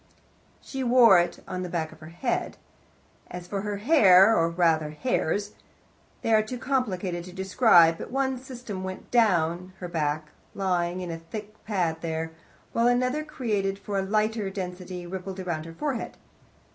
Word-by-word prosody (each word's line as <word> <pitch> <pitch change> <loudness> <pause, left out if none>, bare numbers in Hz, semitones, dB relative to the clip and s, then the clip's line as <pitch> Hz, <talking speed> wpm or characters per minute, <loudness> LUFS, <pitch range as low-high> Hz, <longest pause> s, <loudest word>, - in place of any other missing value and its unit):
She 270 -1 -4
wore 235 -6 +7
it 175 0 -2
on 185 - -4
the 180 - -4
back 160 -2 -2
of 160 - -15
her 155 - -11
head. 205 +9 -2 0.7
As 180 0 -7
for 195 +2 -3
her 205 0 -3
hair, 205 - +6
or 165 -3 +2
rather 165 -3 +2
hairs, 205 +2 -1 0.7
they 225 - +2
are 215 - +6
too 215 +4 -5
complicated 200 -9 -1
to 180 - -10
describe, 185 -3 +4
but - - -6
one 265 0 -1
system 245 -7 -7
went 185 0 -7
down 185 -6 +2
her 180 - -6
back, 155 -2 -2 0.3
lying 180 -2 0
in 175 -2 -4
a 165 - -5
thick 210 +6 -8
pad 180 -6 0
there, 160 -1 -3 0.4
while 230 +1 +3
another, 255 +5 +1
created 210 -10 -2
for 200 0 -3
a - - +1
lighter 215 +1 0
destiny, 180 -1 -6
rippled 190 +1 -6
around 170 -4 -3
her 165 - -9
forehead. 270 - -4
190 Hz, 165 wpm, -26 LUFS, 175-225 Hz, 0.7 s, wore